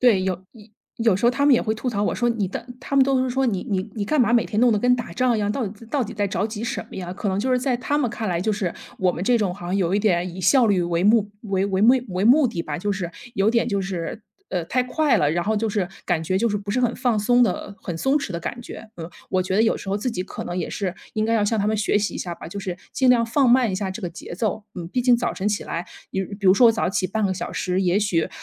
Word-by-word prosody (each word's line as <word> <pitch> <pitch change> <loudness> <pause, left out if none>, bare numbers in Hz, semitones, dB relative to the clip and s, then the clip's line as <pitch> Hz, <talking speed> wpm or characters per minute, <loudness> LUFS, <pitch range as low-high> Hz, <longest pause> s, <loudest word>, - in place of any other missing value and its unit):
对， 225 -7 +4
有 190 -1 0 0.2
有 220 -3 -15 0.3
有 225 -5 +2
时 205 - -3
候 240 - +6
他 285 +3 +1
们 280 - +7
也 - - +3
会 220 0 -1
吐 235 +3 -4
槽 205 -4 -1
我 - - 0
说， 240 -1 +1
你 220 -5 0
的 - - -6
他 275 - -5
们 265 - +7
都 265 -1 +2
是 255 - -1
说： 265 +1 +1
“你 200 +1 -2
你 190 +2 -1
你 205 -2 -2
干 295 +5 +1
嘛 235 0 +3
每 235 - +4
天 215 - -1
弄 245 -2 +5
得 210 - +2
跟 250 +3 +4
打 230 -8 -6
仗 245 +3 +2
一 - - -1
样， 205 - 0
到 230 +1 -1
底 215 +3 -10
到 265 +2 0
底 225 - -7
在 205 -2 -1
着 200 +1 -1
急 215 0 -6
什 260 +3 -3
么 - - -9
呀。” 180 -1 -5
可 200 +1 -3
能 190 - 0
就 255 +6 0
是 255 - +3
在 255 -1 0
他 285 +4 -1
们 255 -5 +1
看 220 -3 -4
来， 170 -1 0
就 215 +3 0
是 200 -4 -2 0.2
我 185 -1 +2
们 175 - -5
这 240 +4 +3
种 195 -5 0
好 175 -3 -9
像 185 - -1
有 190 -1 +1
一 - - +3
点 180 -4 +1
以 190 - -6
效 240 +6 +5
率 190 -4 +2
为 170 0 0
目 210 -1 +4
为 195 -3 0
为 190 -1 0
目 240 +5 +7
为 185 +2 -1
目 265 +4 +6
的 170 -4 -3
吧。 150 +1 -4
就 205 +2 -1
是 180 -3 -4 0.2
有 195 +2 +3
点 235 0 +2
就 200 -4 0
是， 190 +2 -4 0.3
呃， 180 -3 -1
太 255 +5 +1
快 285 +2 +2
了。 145 - +2
然 175 +2 0
后 220 +2 0
就 220 +1 0
是 200 -4 -1 0.2
感 165 -2 0
觉 185 +3 -1
就 230 +3 +2
是 205 - -1
不 200 0 -5
是 255 +4 +1
很 240 -1 +1
放 235 -4 +1
松 245 +4 +4
的 200 -1 -1
很 170 -3 -4
松 270 +7 +1
弛 280 -8 -2
的 170 - -3
感 240 +8 -5
觉。 225 - -10
嗯， 165 0 -7 0.2
我 185 -1 +2
觉 190 +1 -1
得 220 - +5
有 225 - +2
时 - - -9
候 195 - 0
自 230 +5 -2
己 180 -4 -3
可 185 - -7
能 175 - -4
也 - - -2
是 190 -3 -3 0.2
应 215 -1 +1
该 225 - 0
要 210 -2 +2
向 220 +1 0
他 205 - +1
们 220 - +1
学 210 0 +2
习 205 - -2
一 - - -4
下 175 -1 -4
吧， - - -10
就 200 +4 -6
是 185 -2 -4 0.2
尽 260 -3 +2
量 235 -2 +4
放 255 +2 +2
慢 245 -3 +4
一 - - -1
下 190 0 -2
这 190 - -7
个 175 - -2
节 170 -1 -9
奏。 215 +1 -2
嗯， 175 -3 -6
毕 250 +7 -1
竟 245 -1 +5
早 240 - -1
晨 200 +2 -1
起 210 - -2
来， 170 +1 -4 0.3
比 190 - -1 0.2
比 200 - -2
如 185 - +8
说 240 +3 +6
我 - - +4
早 220 - 0
起 190 0 0
半 215 +1 0
个 190 - 0
小 - - -5
时， 185 0 -1
也 180 +2 +2
许， 195 -6 +1
205 Hz, 345 characters per minute, -23 LUFS, 185-235 Hz, 0.3 s, 如